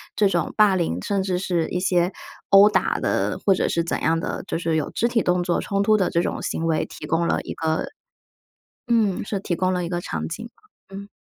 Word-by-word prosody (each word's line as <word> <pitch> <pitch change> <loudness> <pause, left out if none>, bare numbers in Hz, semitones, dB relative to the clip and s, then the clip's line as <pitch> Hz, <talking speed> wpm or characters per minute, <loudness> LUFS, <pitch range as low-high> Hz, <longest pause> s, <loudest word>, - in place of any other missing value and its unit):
这 210 - +3
种 175 -4 -1
霸 210 -3 +5
凌， 170 - -1
甚 195 - -1
至 185 -2 -1
是 175 -3 -1
一 180 - -2
些 180 0 +1 0.4
殴 195 +1 +8
打 - - +1
的， - - -1
或 195 - +5
者 - - 0
是 170 - +1
怎 170 - -3
样 165 0 +2
的， - - -4
就 - - -3
是 165 -1 -1
有 155 -2 -1
肢 235 - 0
体 235 -2 +1
动 180 0 +1
作 175 -1 0
冲 200 0 -1
突 215 +1 +4
的 190 -3 +1
这 170 -1 +1
种 - - -3
行 165 - -3
为 160 -1 +1
提 - - -10
供 165 +1 0
了 - - +1
一 - - -6
个 160 -1 -1 1.0
嗯， 220 -5 +2
是 200 - -3
提 185 -2 -2
供 185 +1 0
了 180 -1 -1
一 - - -4
个 175 0 -2
场 - - -4
景 225 +8 -6
嘛， 195 - -17
嗯。 200 +1 -8
180 Hz, 255 characters per minute, -23 LUFS, 170-200 Hz, 1.0 s, 殴